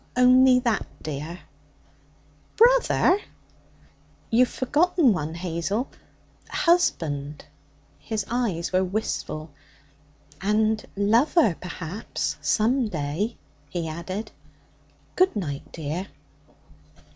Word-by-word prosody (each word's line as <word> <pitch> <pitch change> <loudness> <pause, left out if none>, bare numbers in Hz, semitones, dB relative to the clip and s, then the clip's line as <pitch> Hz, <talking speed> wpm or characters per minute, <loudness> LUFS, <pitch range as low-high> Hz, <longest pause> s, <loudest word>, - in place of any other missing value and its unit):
'Only 255 +1 +6
that, 235 -3 0 0.2
dear?' 155 +4 -5 1.2
'Brother.' 475 -5 +5 1.1
'You've 245 +2 +4
forgotten 295 - +2
one, 160 -2 -3
Hazel 180 +7 -2 0.6
husband.' 150 - +1 0.5
His 215 -3 -3
eyes 225 -9 -1
were 185 +1 +3
wistful. 180 -5 -3 0.9
'And 215 +2 +1
lover, 225 - +3
perhaps, 180 +3 -4
some 235 +3 +2
day,' 165 +6 -3 0.3
he 165 +1 -3
added. 185 +7 -5 0.8
'Good 370 -4 +3
night, 145 -9 -4
dear.' 165 +4 -4
205 Hz, 80 wpm, -25 LUFS, 165-250 Hz, 1.2 s, Only